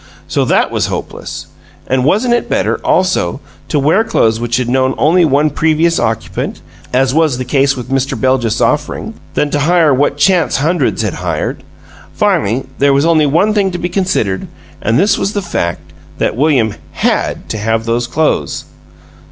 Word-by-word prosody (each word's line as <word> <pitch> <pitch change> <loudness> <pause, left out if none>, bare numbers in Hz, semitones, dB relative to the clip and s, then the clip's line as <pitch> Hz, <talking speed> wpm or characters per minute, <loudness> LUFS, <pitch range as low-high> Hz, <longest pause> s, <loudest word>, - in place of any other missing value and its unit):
So - - 0
that - - +2
was - - 0
hopeless. - - -6 0.4
And 130 0 0
wasn't 215 - +2
it 240 - -1
better, - - 0
also, 185 - +1 0.3
to 150 - -1
wear 155 +10 +3
clothes 115 - +1
which 120 0 -1
had 125 -2 -1
known 130 +1 +1
only 170 +3 +4
one 150 +1 +2
previous 160 +3 +1
occupant 115 0 -2 0.3
(as 130 +1 +2
was 155 -4 +2
the 130 - -4
case 135 +1 +1
with 125 0 -7
Mr. 135 0 -1
Beljus's 130 -4 +1
offering) 150 +9 -1 0.2
than 150 - 0
to 145 - 0
hire 160 0 +3
what 140 +2 +1
chance 170 +3 +2
hundreds 150 -5 0
had 100 -5 -1
hired? - - -3 0.5
Finally, 115 +7 +1
there 140 +1 +4
was 140 +2 +2
only 160 -3 +3
one 180 +9 +2
thing 200 -2 +2
to 175 - -4
be 175 0 -3
considered 180 - -1 0.3
and 110 +2 +1
this 200 +5 +2
was 200 - -1
the 205 - -1
fact 85 - -3 0.2
that - - 0
William 130 -6 +2 0.2
HAD - - -1
to 110 - -3
have 115 +1 -1
those 120 +1 0
clothes! 155 +3 -1
140 Hz, 175 wpm, -14 LUFS, 125-170 Hz, 0.5 s, only